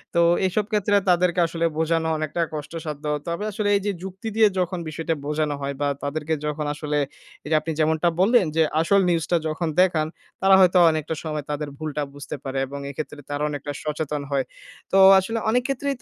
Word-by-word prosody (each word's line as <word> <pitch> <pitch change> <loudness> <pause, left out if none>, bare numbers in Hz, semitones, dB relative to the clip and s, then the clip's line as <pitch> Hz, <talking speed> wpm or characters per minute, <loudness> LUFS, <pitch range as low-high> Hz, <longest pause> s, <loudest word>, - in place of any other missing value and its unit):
তো 170 - +5 0.3
এসব 205 +3 0
ক্ষেত্রে 205 -1 +2
তাদেরকে 180 0 +3
আসলে 165 0 -2
বোঝানো 160 0 +1
অনেকটা 155 +2 -2
কষ্টসাধ্য। 150 0 -6 0.2
তবে 170 +5 -2
আসলে 205 0 -1
এই 200 - +1
যে, 205 - +1
যুক্তি 190 +3 -7
দিয়ে 220 -1 +6
যখন 180 0 -1
বিষয়টা 160 +1 -2
বোঝানো 150 0 -1
হয় 140 0 -3
বা 145 - +2 0.2
তাদেরকে 150 +2 -2
যখন 150 0 -2
আসলে 150 0 -2 0.5
এই - - -6
যে, - - +4
আপনি 165 - -4
যেমনটা 160 +2 +2
বললেন 200 +1 +5
যে, 165 - +4 0.2
আসল 200 +4 +3
নিউজটা 170 0 +1
যখন 160 +2 -2
দেখান, 160 -4 +2 0.3
তারা 195 0 +6
হয়তো 185 0 +5
অনেকটা 155 0 -2
সময় 155 -2 -3
তাদের 150 0 -3
ভুলটা 155 -1 -3
বুঝতে 145 +1 -7
পারে 135 0 -4
এবং 140 +1 -7
এক্ষেত্রে 145 +1 -6
তারা 145 +1 -2
অনেকটা 145 0 -5
সচেতন 150 -1 -3
হয়। 135 -2 +1 0.5
তো 195 - +3 0.2
আসলে 225 +5 -2
অনেক 250 +1 +2
ক্ষেত্রেই 275 +1 -1
160 Hz, 185 wpm, -23 LUFS, 150-185 Hz, 0.5 s, দিয়ে